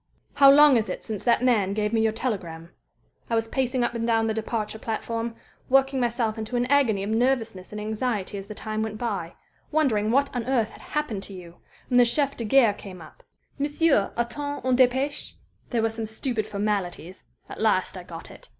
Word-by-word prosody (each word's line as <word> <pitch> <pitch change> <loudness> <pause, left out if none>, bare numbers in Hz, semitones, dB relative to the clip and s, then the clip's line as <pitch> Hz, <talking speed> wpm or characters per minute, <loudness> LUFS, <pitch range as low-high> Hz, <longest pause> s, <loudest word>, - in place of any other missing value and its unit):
"How 275 -1 +7
long 290 -1 +7
is 220 - -1
it - - -5
since 215 -3 -5
that 240 0 +3
man 205 -6 +2
gave 210 0 -1
me 225 - +3
your 220 0 +2
telegram? 175 -8 -4 0.6
I 230 - +1
was 225 0 0
pacing 255 0 0
up 240 - 0
and 230 0 -2
down 225 -1 +2
the 220 - 0
departure 220 0 -3
platform, 230 +1 -3 0.3
working 270 0 +3
myself 235 -2 -1
into 220 +3 -4
an 245 0 +1
agony 235 -9 +3
of 205 - -3
nervousness 225 -5 0
and 210 - -6
anxiety 215 -2 -2
as 195 - -10
the 215 - -8
time 215 +1 -4
went 220 -1 -3
by, 200 -8 -3 0.4
wondering 245 -9 +2
what 275 +3 +1
on 245 - -1
earth 240 -5 +1
had - - -14
happened 295 -10 -3
to 200 - -10
you, 175 -2 -11 0.3
when 250 -1 +3
the 245 - +7
chef 280 +4 +1
de 230 - -4
gare 230 -1 +5
came 190 -3 -10
up: 155 -2 -14 0.4
'Monsieur 290 -6 +2
attend 285 +4 -3
une 255 -1 +3
dépêche?' 260 +3 +1 0.4
There 235 -3 0
were 225 - +1
some 225 0 -4
stupid 220 0 -3
formalities 195 -4 -3 0.2
at - - -8
last - - +2
I - - -6
got - - -10
it. - - -15
225 Hz, 205 wpm, -25 LUFS, 210-255 Hz, 0.6 s, How